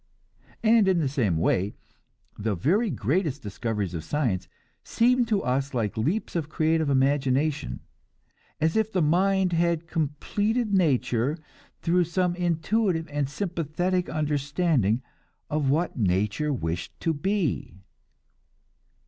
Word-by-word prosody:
And 220 -2 +5
in 190 -2 +3
the 155 -4 +1
same 120 - 0
way, 95 +4 +1 0.6
the 105 -1 -2
very 195 - +2
greatest 145 - -1
discoveries 105 -2 -3
of 80 -3 -4
science 100 - -1 0.4
seem 245 +1 +3
to 215 -4 0
us 135 +2 -1
like 110 -4 -1
leaps 165 - -1
of 160 -3 -2
creative 160 -1 +1
imagination; 140 +2 +1 0.8
as 160 +1 +1
if 220 0 +1
the 185 -5 +1
mind 185 +3 +2
had 170 -1 +1
completed 205 - -1
nature, 140 - +2 0.5
through 175 +1 +3
some 180 +1 0
intuitive 175 +1 0
and 145 -2 -1
sympathetic 175 +1 -1
understanding 145 - 0 0.5
of 150 -2 +1
what 160 +6 +1
nature 105 +9 +1
wished 85 - -4
to 165 - +1
be. 175 - -1
155 Hz, 120 wpm, -26 LUFS, 130-180 Hz, 0.8 s, And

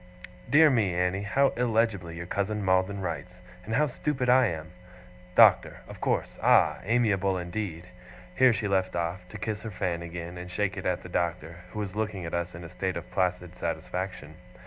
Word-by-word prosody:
Dear 155 +3 +7
me, 105 -8 +1
Annie, 90 +2 0
how 135 +7 +2
illegibly 110 -8 0
your 85 +1 -6
cousin 100 +2 -2
Maldon 95 +1 +2
writes, 90 0 -5 0.3
and 110 +4 -3
how 150 +4 +4
stupid 130 -2 -2
I 130 0 +6
am! 80 -2 -5 0.6
"Doctor," - - +5
of - - -11
course. - - -1
Ah! - - +4
amiable 100 -4 +2
indeed!' 90 -1 -4 0.5
Here 130 -1 +6
she 110 -1 -1
left 95 -2 0
off, 85 +1 -2
to - - -8
kiss 110 -2 -3
her 110 - -5
fan 90 -4 -2
again, 85 +1 -7
and 90 0 -8
shake 100 +2 -1
it 95 - -4
at 90 -1 -1
the - - -8
Doctor, 85 -1 -2
who - - -9
was 105 -2 -4
looking 105 -4 -2
at 85 - -6
us 85 0 -2
in 85 - -8
a 85 - -8
state 95 +1 -3
of 85 - -8
placid 90 -1 -1
satisfaction. 85 -1 -4
95 Hz, 190 wpm, -28 LUFS, 85-110 Hz, 0.6 s, Dear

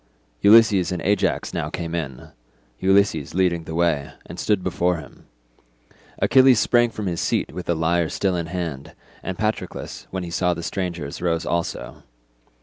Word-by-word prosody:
Ulysses 105 -4 +6
and 90 - -2
Ajax 100 +2 0
now - - -2
came 85 -1 -5
in—Ulysses 75 +4 -2
leading 85 -3 +1
the 80 - -6
way—and 85 0 -2
stood 100 -1 +1
before 90 -1 0
him. 75 -3 -13 0.9
Achilles 130 -3 +5
sprang 120 +1 +3
from 110 -2 -6
his 85 -3 -2
seat - - -1
with 90 +1 -6
the 85 - +1
lyre 80 +1 +1
still 95 -2 0
in 85 -1 -2
his 85 - -10
hand, 80 -7 -5 0.3
and 95 -1 -5
Patroclus, 110 +1 -4
when 95 -1 -4
he 85 - -6
saw 90 0 +1
the 85 - -6
strangers, 85 -6 -4
rose 85 -2 0
also. 85 0 -3
85 Hz, 155 wpm, -23 LUFS, 80-95 Hz, 0.9 s, Ulysses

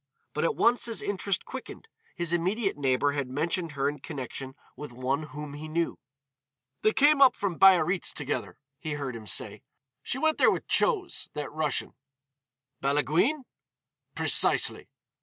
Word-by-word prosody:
But - - -2
at 465 - +1
once 240 +1 +3
his 230 -2 -3
interest 200 -2 -1
quickened; 260 +11 -9 0.3
his 170 -1 -2
immediate 195 +5 0
neighbor 140 0 +1
had 140 -3 -3
mentioned 160 +4 -1
her 140 0 0
in 145 +1 -3
connection 135 -2 -7 0.2
with 145 0 -8
one 130 +4 -2
whom 150 -1 -8
he 150 +2 -7
knew. 165 +2 -2 0.8
"They 215 - +3
came 290 +4 +4
up 260 -2 +7
from 190 -5 -3
Biarritz 185 -1 +5
together," 145 -1 -4 0.2
he 155 -1 -4
heard 140 -4 -4
him 110 -2 -9
say. - - -2 0.4
"She 245 - -2
went 315 +3 +1
there - - +6
with - - -1
Chose, 390 -7 +1
that 150 -1 -4
Russian." 155 -3 -1 0.9
"Balaguine?" 155 - +1 0.7
"Precisely." - - +3
155 Hz, 150 wpm, -28 LUFS, 145-205 Hz, 0.9 s, up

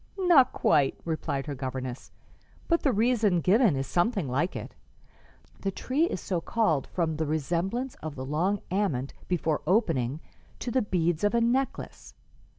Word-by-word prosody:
"Not 345 -9 +5
quite," 145 -4 +2
replied 155 -4 -2
her 150 - -4
governess, 130 -1 -5 0.6
"but 335 -1 +2
the 275 - +2
reason 220 -4 +2
given 195 - +4
is 135 0 -1
something 180 - 0
like 145 +8 -1
it. - - -6 0.9
The 195 - -1
tree 265 - 0
is 265 - -3
so 175 -1 -2
called 165 - +1
from 160 -3 -1
the 160 -1 -1
resemblance 175 - -1
of 155 -2 -6
the 130 -1 -5
long 180 +8 0
ament, 160 -10 -1
before 165 -4 0
opening, 155 - +1 0.4
to 245 - -4
the 260 - +2
beads 175 -4 0
of 205 +3 +2
a - - +4
necklace. 255 +3 -2
175 Hz, 155 wpm, -28 LUFS, 150-230 Hz, 0.9 s, Not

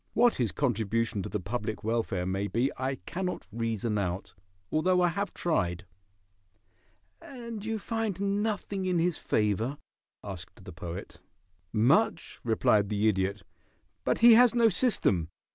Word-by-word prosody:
What 240 +1 +4
his 120 -6 0
contribution 115 -4 0
to - - -5
the - - -2
public 110 +3 -4
welfare 110 -5 -1
may 95 +2 -1
be 120 +7 0
I 130 +1 -2
cannot 180 0 -3
reason 115 -1 -1
out, 95 -1 -3 0.4
although 180 +4 +3
I 175 - +4
have 200 +2 -2
tried." 90 - -1 1.4
"And 235 -5 -8
you 225 0 -2
find 220 -3 -2 0.2
nothing 205 -3 -2
in 180 -1 +1
his 170 0 +1
favor?" 110 +6 0 0.5
asked 95 -1 -9
the 90 - -9
Poet. 85 -1 -8 0.5
"Much," 145 - +2
replied 110 -3 +2
the 105 0 +1
Idiot, 95 -1 0 0.6
"but - - +1
he 240 - +10
has 245 +1 +6
no 230 -1 +5
system. 175 - +1
115 Hz, 140 wpm, -29 LUFS, -, 1.4 s, he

